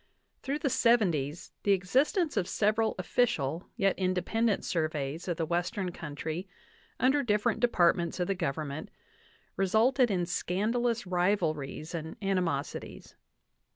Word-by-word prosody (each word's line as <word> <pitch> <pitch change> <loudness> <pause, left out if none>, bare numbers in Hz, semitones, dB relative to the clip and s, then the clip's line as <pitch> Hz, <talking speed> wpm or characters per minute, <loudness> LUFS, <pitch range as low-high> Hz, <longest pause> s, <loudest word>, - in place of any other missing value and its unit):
Through 280 +2 -2
the 300 - -2
'70*5 175 - +2
the 200 - +3
existence 270 - +1
of 190 -4 0
several 215 +1 +1
official 180 - 0
yet 195 -1 +1
independent 190 +4 0
surveys 155 -1 -2
of 175 -3 -1
the 165 - 0
Western 175 +3 -1
country 160 +2 -5 0.5
under 265 +4 +3
different 225 -1 +1
departments 175 -7 +2
of 180 - +1
the 195 - 0
Government 155 -3 -3 0.7
re 195 - +2
sulted 240 +5 +3
in 180 -4 0
scandalous 230 +7 0
rivalries 175 -5 -1
and 160 -1 -5
animosities. 180 -8 -2
185 Hz, 120 wpm, -30 LUFS, 165-225 Hz, 0.7 s, the